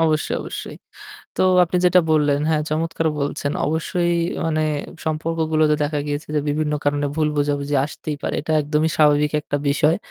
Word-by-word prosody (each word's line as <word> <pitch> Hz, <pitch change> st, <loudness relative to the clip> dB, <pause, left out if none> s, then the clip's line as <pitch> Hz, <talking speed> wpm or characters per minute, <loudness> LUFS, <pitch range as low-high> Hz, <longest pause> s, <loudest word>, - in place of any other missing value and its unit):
অবশ্যই, 155 Hz, -1 st, +1 dB
অবশ্যই। -, -, -7 dB, 0.6 s
তো -, -, +2 dB, 0.2 s
আপনি 175 Hz, +1 st, -2 dB
যেটা 180 Hz, 0 st, +5 dB
বললেন, 145 Hz, -2 st, +2 dB
হ্যাঁ 155 Hz, -1 st, +1 dB
চমৎকার 165 Hz, +1 st, -1 dB
বলছেন। 145 Hz, 0 st, -2 dB
অবশ্যই 170 Hz, +3 st, 0 dB, 0.3 s
মানে 155 Hz, -1 st, 0 dB, 0.4 s
সম্পর্কগুলোতে 155 Hz, -1 st, +1 dB
দেখা 145 Hz, 0 st, -1 dB
গিয়েছে 145 Hz, +2 st, -4 dB
যে -, -, +3 dB
বিভিন্ন 150 Hz, +1 st, -1 dB
কারণে 145 Hz, 0 st, +1 dB
ভুল 155 Hz, -1 st, +2 dB
বোঝাবুঝি 145 Hz, 0 st, 0 dB
আসতেই 150 Hz, 0 st, -5 dB
পারে। -, -, -2 dB
এটা 160 Hz, -, -2 dB
একদমই 150 Hz, +2 st, 0 dB
স্বাভাবিক 150 Hz, -1 st, +3 dB
একটা 145 Hz, -, -3 dB
বিষয়। 150 Hz, +3 st, +3 dB
155 Hz, 155 wpm, -21 LUFS, 145-160 Hz, 0.6 s, যেটা